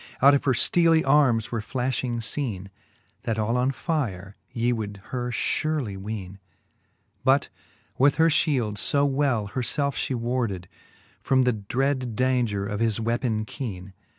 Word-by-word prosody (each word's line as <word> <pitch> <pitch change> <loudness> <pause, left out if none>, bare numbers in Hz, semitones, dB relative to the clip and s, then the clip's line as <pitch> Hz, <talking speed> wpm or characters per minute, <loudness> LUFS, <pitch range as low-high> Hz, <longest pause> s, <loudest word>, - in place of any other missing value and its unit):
Out 140 +2 +7
of 140 - +1
her 135 - +3
fteely 165 +5 +4
armes 135 -6 +3
were 115 -2 -2
flafliing 125 0 -2
feene,. 110 -6 -3 0.5
That 110 - -2
all 110 +2 0
on 125 +1 +2
fire 110 - -3 0.2
ye 120 +1 0
would 105 -3 -5
her 125 -1 -2
furely 130 -1 -1
weene. 100 -1 -6 0.8
But - - +3 0.5
with 140 +2 +5
her 165 0 +4
fliield 125 - +1
fo 140 +6 +2
well 135 -6 +1
her 130 - -3
felfe 140 +3 0
flie 130 - -2
warded, 115 -7 -2 0.5
From 130 -1 +3
the 125 -1 +2
dread 125 +3 -2
daunger 120 -6 +1
of 105 -1 -3
his 115 -2 +1
weapon 115 -1 -1
keene. 100 -7 -7
120 Hz, 150 wpm, -25 LUFS, 105-135 Hz, 0.8 s, Out